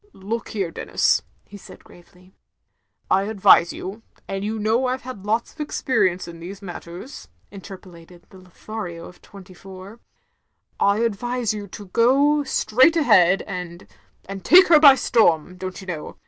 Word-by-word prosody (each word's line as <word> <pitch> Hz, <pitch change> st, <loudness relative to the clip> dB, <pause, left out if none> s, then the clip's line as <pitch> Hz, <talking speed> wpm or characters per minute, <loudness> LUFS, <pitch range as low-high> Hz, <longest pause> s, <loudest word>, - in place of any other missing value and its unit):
"Look 220 Hz, +5 st, -5 dB
here, 195 Hz, -6 st, -3 dB
Denis, -, -, 0 dB
— -, -, -39 dB
*' -, -, -41 dB
he 205 Hz, -, -10 dB
said -, -, -15 dB
gravely, 180 Hz, +1 st, -20 dB, 0.8 s
"I 195 Hz, +1 st, +2 dB
advise 195 Hz, -5 st, +4 dB
you 200 Hz, +4 st, -8 dB
— -, -, -33 dB
^and 195 Hz, 0 st, -4 dB
you 215 Hz, +2 st, -3 dB
know 220 Hz, +4 st, 0 dB
I 255 Hz, +1 st, -1 dB
've -, -, -23 dB
had 240 Hz, -6 st, -9 dB
lots 225 Hz, +2 st, -1 dB
of 310 Hz, -, -9 dB
ex 295 Hz, -, -4 dB
perience 185 Hz, -9 st, 0 dB
in 170 Hz, -1 st, -11 dB
these 185 Hz, +4 st, -9 dB
matters," 180 Hz, +4 st, -10 dB, 0.2 s
interpolated 180 Hz, -3 st, -13 dB
the 190 Hz, -, -15 dB
Lothario 180 Hz, -1 st, -9 dB
of 180 Hz, -, -15 dB
twenty 190 Hz, -2 st, -15 dB
four, 190 Hz, +4 st, -13 dB, 0.8 s
"I 200 Hz, +2 st, +2 dB
advise 235 Hz, +1 st, -2 dB
you 205 Hz, -1 st, -7 dB
to 205 Hz, +2 st, -11 dB
go 280 Hz, +8 st, +2 dB
straight 265 Hz, +3 st, +2 dB
ahead 195 Hz, -, +4 dB
and 180 Hz, -3 st, -8 dB, 0.2 s
— -, -, -34 dB
^and 195 Hz, 0 st, -7 dB
take 370 Hz, -, +6 dB
her 320 Hz, -3 st, +7 dB
by 285 Hz, -3 st, +8 dB
storm, 180 Hz, -, +1 dB
don't 185 Hz, 0 st, -7 dB
you 195 Hz, -, -11 dB
know. 170 Hz, -5 st, -7 dB
200 Hz, 175 wpm, -21 LUFS, 180-230 Hz, 0.8 s, by